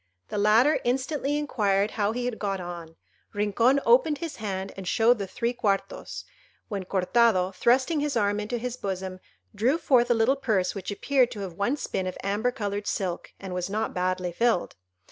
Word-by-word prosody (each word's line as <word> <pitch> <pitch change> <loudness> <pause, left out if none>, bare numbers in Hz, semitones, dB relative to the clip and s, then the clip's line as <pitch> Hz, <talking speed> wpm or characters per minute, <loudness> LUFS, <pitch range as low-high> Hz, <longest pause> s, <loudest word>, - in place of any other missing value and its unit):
The 210 - -2
latter 225 +9 +4
instantly 270 +3 0
inquired 210 -8 +1
how 210 -1 0
he 245 +2 -3
had 245 -3 -3
got 195 -2 -2
on. 170 -2 -7 0.4
Rincon 230 +6 +3
opened 470 -12 +4
his 330 -1 -6
hand 195 -3 -4
and 190 -2 -7
showed 230 +4 +3
the 200 - -3
three 235 +5 -2
quartos; 200 -5 -2 0.5
when 200 -4 -4
Cortado, 190 0 +2
thrusting 260 - +2
his 290 -3 -1
arm 205 -1 +1
into 210 +3 -3
his 245 +1 -4
bosom, 190 -3 -4 0.3
drew 255 +8 +2
forth 255 -7 +3
a 240 - +4
little 230 +5 +3
purse 215 -9 0
which 195 - -6
appeared 255 +4 +2
to 210 - -7
have 190 -3 -5
once 220 - -1
been 185 - -2
of 185 - -5
amber 205 +5 0
coloured 205 -4 -4
silk, 180 -3 -3
and 190 -2 -6
was 180 +1 -2
not 215 +2 -2
badly 180 0 -1
filled. 230 0 +1
210 Hz, 185 wpm, -26 LUFS, 195-245 Hz, 0.5 s, latter